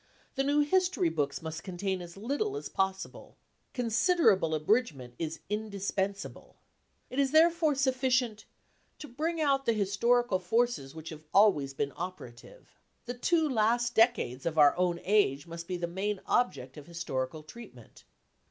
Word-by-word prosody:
The 270 - 0
new 290 +2 +2
history 360 - +2
books 145 -2 -2
must 160 0 -6
contain 190 0 -3
as 175 +1 -10
little 290 - -2
as - - -6
possible. 190 0 -3 0.3
ce - - -29
Considerable 230 - +2
abridgment 155 - 0
is 160 -1 -4
indispensable." 200 -2 -4 0.6
It 255 - -3
is 275 -1 +3
therefore 320 0 +4
sufficient 255 -4 +1
ce - - -24 0.6
to 300 - -7
bring 320 +6 -3
out 275 -3 +1
the 230 - +4
historical 215 +1 +1
forces 185 - 0
which 160 0 -8
have 155 -1 -11
always 150 -10 +4
been 140 0 -2
operative." 180 - -9 0.3
The 245 - -4
two 320 +6 +1
last 240 -1 +1
decades 220 - +2
of 160 -1 -3
our 145 -2 +6
own 175 -1 0
age 180 -9 +2
must 170 0 -8
be 180 - -3
the 175 - -2
main 190 +4 -3
object 140 - 0
of 145 - -11
historical 155 -3 -4
treatment. 155 - -13
200 Hz, 150 wpm, -30 LUFS, 165-255 Hz, 0.6 s, our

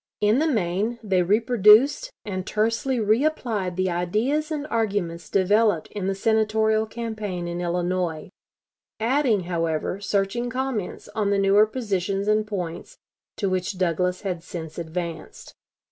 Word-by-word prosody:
In 210 +4 +3
the 320 - +2
main, 215 - 0
they 190 -4 +2
reproduced 225 - +4 0.2
and 185 -3 -3
tersely 230 +4 0
re 220 +4 +2
applied 225 - -1
the 185 0 0
ideas 215 - 0
and 300 -2 -3
arguments 200 -7 -1
developed 205 -2 +2
in 200 -2 -3
the 195 - 0
Senatorial 220 +1 +2
campaign 215 -6 -4
in 175 +1 -4
Illinois, 175 -1 -2 0.7
adding, 235 -2 +2
however, 170 0 -2
searching 205 +5 -1
comments 255 -6 -3
on 205 -1 -1
the 200 - +2
newer 200 +2 +5
positions 200 -4 -2
and 215 0 +2
points 190 - -5 0.4
to 200 - -1
which 185 +1 -2
Douglas 180 0 0
had 180 -4 -3
since 165 -3 -7
advanced. 170 0 -6
205 Hz, 135 wpm, -24 LUFS, 180-225 Hz, 0.7 s, newer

